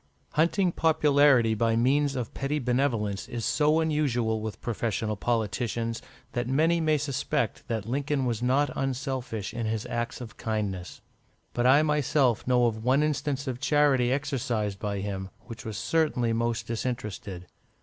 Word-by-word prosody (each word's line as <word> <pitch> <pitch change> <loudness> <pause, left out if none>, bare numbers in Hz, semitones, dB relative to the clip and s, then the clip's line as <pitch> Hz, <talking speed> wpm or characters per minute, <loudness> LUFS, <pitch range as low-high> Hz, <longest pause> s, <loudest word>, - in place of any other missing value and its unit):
Hunting 175 +4 +2
popularity 145 -8 +4
by 115 +1 +1
means 135 +4 +2
of 125 -4 -4
petty 140 +2 -1
benevolence 120 -6 0
is 120 -2 -4
so 150 +1 +3
usual 125 -8 0
with 110 -1 -5
professional 110 -2 -2
politicians, 115 +1 -1 0.3
that 120 -1 -2
many 160 +6 +2
may 155 -1 +3
suspect 140 -3 -2
that 110 -4 -2
Lincoln 140 +3 -1
was 115 -2 -1
not 135 +4 +2
unselfish 130 -5 -3
in 115 -2 -2
his 110 -1 -2
acts 120 -1 -3
of 115 -3 -9
kindness. 105 -5 -3 0.5
But 120 +1 +2
I 140 +4 +6
myself 145 -6 +1
know 125 -1 +4
of 110 -1 -1
one 130 +4 +3
instance 145 -2 -1
of 130 -3 -4
charity 135 -2 +3
exercised 120 -7 -1
by 100 -2 -2
him, 95 -1 -4
which 115 -1 -10
was 110 -2 -4
certainly 125 -2 +1
most 115 0 -1
disinterested. 105 -6 -4
120 Hz, 150 wpm, -27 LUFS, 110-140 Hz, 0.5 s, I